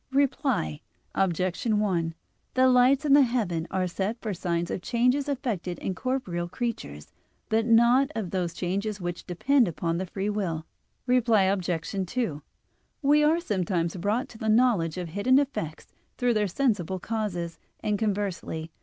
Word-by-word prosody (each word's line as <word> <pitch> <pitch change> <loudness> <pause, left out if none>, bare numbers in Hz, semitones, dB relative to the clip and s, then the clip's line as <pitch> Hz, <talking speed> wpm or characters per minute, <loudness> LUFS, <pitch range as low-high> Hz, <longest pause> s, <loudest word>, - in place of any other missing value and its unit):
Reply 270 - 0 0.3
Obj. 185 -1 0
1: 190 -7 +1 0.4
The 260 0 +5
lights 255 +3 +4
in 280 - +4
the 285 - +8
heaven 210 -10 0
are 185 -1 0
set 195 +6 -2
for 215 -3 -3
signs 170 -1 -2
of - - -3
changes 250 +7 +1
effected 220 - -2
in 190 - -3
corporeal 185 -8 -2
creatures, 185 - -5 0.4
but 220 +1 +2
not 235 +4 +5
of 210 -6 -3
those 175 -3 -2
changes 200 +3 -2
which 175 -1 -5
depend 245 +8 +3
upon 165 0 -2
the 185 - -3
free 195 +3 -2
will. 170 -6 -2 0.4
Reply 240 -5 +4
Obj. 190 -2 0 0.4
2: 180 - -2 0.6
We 295 +2 +5
are 315 +3 +4
sometimes 180 - -1
brought 205 +7 -1
to 220 - -13
the 220 - -1
knowledge 215 -8 +3
of 175 -2 -4
hidden 205 +10 +3
effects 210 - -2 0.3
through 245 -1 +2
their 210 -2 +1
sensible 190 - 0
causes, 180 -5 -3 0.2
and 210 -1 0
conversely. 195 -6 -2
205 Hz, 155 wpm, -27 LUFS, 175-245 Hz, 0.6 s, the